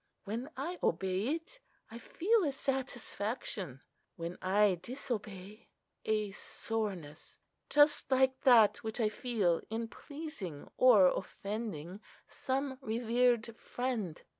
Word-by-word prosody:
When 230 Hz, +7 st, -4 dB
I 335 Hz, +6 st, -4 dB
obey 190 Hz, +4 st, 0 dB
it, 340 Hz, +10 st, -10 dB, 0.3 s
I 230 Hz, -, -7 dB
feel 415 Hz, -, +2 dB
a 295 Hz, -, +1 dB
satisfaction; 235 Hz, -, -3 dB, 0.3 s
when 170 Hz, +1 st, -5 dB
I 190 Hz, -1 st, +3 dB
disobey, 215 Hz, -5 st, -6 dB, 0.4 s
a 215 Hz, -2 st, 0 dB
soreness—just 215 Hz, -, -1 dB
like 260 Hz, 0 st, +3 dB
that 235 Hz, -6 st, +6 dB
which 220 Hz, +2 st, -5 dB
I 220 Hz, -2 st, +3 dB
feel 210 Hz, -7 st, 0 dB
in 225 Hz, +1 st, -2 dB
pleasing 285 Hz, -, -7 dB
or 230 Hz, -7 st, +7 dB
offending 195 Hz, -2 st, -3 dB, 0.2 s
some 265 Hz, 0 st, -3 dB
revered 235 Hz, 0 st, +1 dB
friend. 235 Hz, -10 st, -3 dB
225 Hz, 105 wpm, -33 LUFS, 195-260 Hz, 0.4 s, or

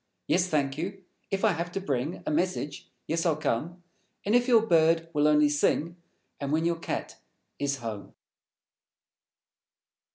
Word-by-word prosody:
Yes, 180 Hz, +2 st, +2 dB
thank 145 Hz, -4 st, 0 dB
you! 190 Hz, +3 st, -5 dB, 0.3 s
If 195 Hz, +3 st, 0 dB
I 215 Hz, -, +5 dB
Have 170 Hz, +1 st, -3 dB
to -, -, -1 dB
Bring 150 Hz, -3 st, -2 dB
A -, -, -1 dB
message, 150 Hz, -3 st, -1 dB, 0.2 s
yes, 165 Hz, +1 st, -1 dB
I'll 165 Hz, -3 st, +2 dB
come; 160 Hz, +5 st, -2 dB, 0.4 s
And 205 Hz, -, +1 dB
if 245 Hz, +1 st, +4 dB
your 230 Hz, -3 st, +5 dB
Bird 165 Hz, -3 st, +3 dB
will 150 Hz, 0 st, +3 dB
only 150 Hz, 0 st, +5 dB
Sing; 150 Hz, +3 st, +1 dB, 0.4 s
And 140 Hz, -1 st, -3 dB
when 160 Hz, +2 st, +1 dB
your 170 Hz, -1 st, 0 dB
Cat -, -, -4 dB, 0.4 s
is 140 Hz, -1 st, 0 dB
home. 110 Hz, -5 st, -7 dB
165 Hz, 155 wpm, -28 LUFS, 145-180 Hz, 0.4 s, I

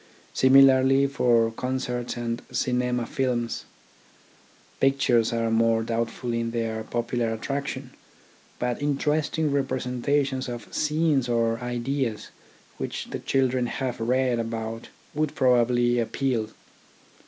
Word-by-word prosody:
Similarly 135 Hz, 0 st, +6 dB
for 120 Hz, -4 st, +2 dB
concerts 125 Hz, 0 st, -3 dB
and 115 Hz, -1 st, -3 dB
cinema 125 Hz, -1 st, 0 dB
films. 120 Hz, -3 st, -2 dB, 1.1 s
Pictures 135 Hz, -4 st, +3 dB
are 115 Hz, -1 st, 0 dB
more 115 Hz, 0 st, +3 dB
doubtful 115 Hz, +1 st, -2 dB
in 115 Hz, 0 st, -1 dB
their 115 Hz, -1 st, -2 dB
popu 120 Hz, +2 st, -3 dB
lar 115 Hz, -1 st, +1 dB
attraction; 135 Hz, +2 st, -4 dB, 0.7 s
but 125 Hz, +1 st, -2 dB
interesting 150 Hz, +2 st, 0 dB
representations 135 Hz, 0 st, -1 dB
of 120 Hz, -1 st, -8 dB
scenes 150 Hz, -4 st, +1 dB
or 115 Hz, -1 st, +1 dB
ideas 125 Hz, -1 st, -3 dB, 0.5 s
which -, -, -5 dB
the -, -, -3 dB
children 130 Hz, -2 st, +1 dB
have 130 Hz, -1 st, -3 dB
read 125 Hz, +1 st, +1 dB
about 115 Hz, 0 st, -4 dB, 0.3 s
would 155 Hz, 0 st, -1 dB
probably 120 Hz, -1 st, +3 dB
appeal. 120 Hz, -1 st, -1 dB
125 Hz, 110 wpm, -25 LUFS, 115-135 Hz, 1.1 s, Similarly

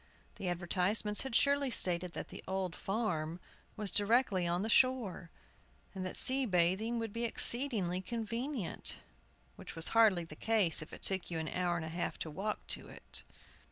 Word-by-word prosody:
The 185 Hz, -, -3 dB
advertisements 185 Hz, +4 st, +1 dB
had 265 Hz, -4 st, -4 dB
surely 280 Hz, 0 st, +3 dB
stated 180 Hz, -6 st, +1 dB
that -, -, -6 dB
the -, -, -9 dB
"Old 190 Hz, -2 st, -2 dB
Farm" 180 Hz, -6 st, -2 dB, 0.4 s
was 210 Hz, -2 st, 0 dB
directly 205 Hz, -4 st, +2 dB
on 175 Hz, +2 st, 0 dB
the -, -, -2 dB
shore, 230 Hz, -8 st, +2 dB, 0.6 s
and 190 Hz, -2 st, -5 dB
that -, -, -6 dB
sea 260 Hz, 0 st, +4 dB
bathing 190 Hz, +5 st, +1 dB
would 225 Hz, -3 st, -4 dB
be 230 Hz, -, -3 dB
exceedingly 230 Hz, -7 st, +2 dB
convenient; 230 Hz, -, -2 dB, 0.6 s
which -, -, -9 dB
was 165 Hz, 0 st, +2 dB
hardly 215 Hz, -6 st, +4 dB
the 160 Hz, -2 st, -11 dB
case 210 Hz, -5 st, +2 dB
if 155 Hz, -, -10 dB
it -, -, -11 dB
took 190 Hz, -2 st, +1 dB
you 170 Hz, -, -3 dB
an 160 Hz, -1 st, -3 dB
hour 180 Hz, -1 st, -1 dB
and 165 Hz, -2 st, -3 dB
a -, -, -6 dB
half 170 Hz, +2 st, -3 dB
to 160 Hz, -, -5 dB
walk 205 Hz, +7 st, -4 dB
to -, -, 0 dB
it. -, -, -4 dB
195 Hz, 175 wpm, -33 LUFS, 175-230 Hz, 0.6 s, sea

